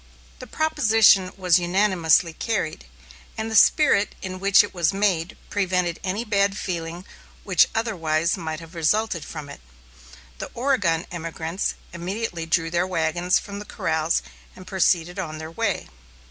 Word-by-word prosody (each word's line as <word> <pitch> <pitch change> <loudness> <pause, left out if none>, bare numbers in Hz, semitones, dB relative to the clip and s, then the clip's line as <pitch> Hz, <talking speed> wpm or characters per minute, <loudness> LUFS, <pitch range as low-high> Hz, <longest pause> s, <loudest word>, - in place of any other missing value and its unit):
The 255 - -9
proposition 225 -11 +3
was 185 -1 +3
unanimously 175 -2 +2
carried; 180 - -3 0.5
and 220 +1 -3
the - - -2
spirit 220 -4 +4
in 185 -1 -5
which 200 +1 +5
it 205 - -7
was 175 -1 +1
made 190 -4 0
prevented 180 -4 0
any 200 +5 -2
bad 200 -2 +1
feeling 170 -1 -5 0.4
which - - +4
otherwise 170 -7 0
might 160 -4 -5
have 165 +1 -13
resulted 170 +1 0
from 155 -1 -8
it. 140 - -11 0.8
The - - -5
Oregon 205 -11 +1
emigrants 165 +1 -3 0.2
immediately 175 -1 -4
drew 165 0 +1
their 175 +1 +1
wagons 175 +1 +1
from 200 0 -6
the - - -6
corrals 160 -6 -1 0.3
and 185 - -12
proceeded 180 -2 +1
on 155 -4 -4
their 155 +1 -7
way. 165 - -2
180 Hz, 145 wpm, -23 LUFS, 165-205 Hz, 0.8 s, which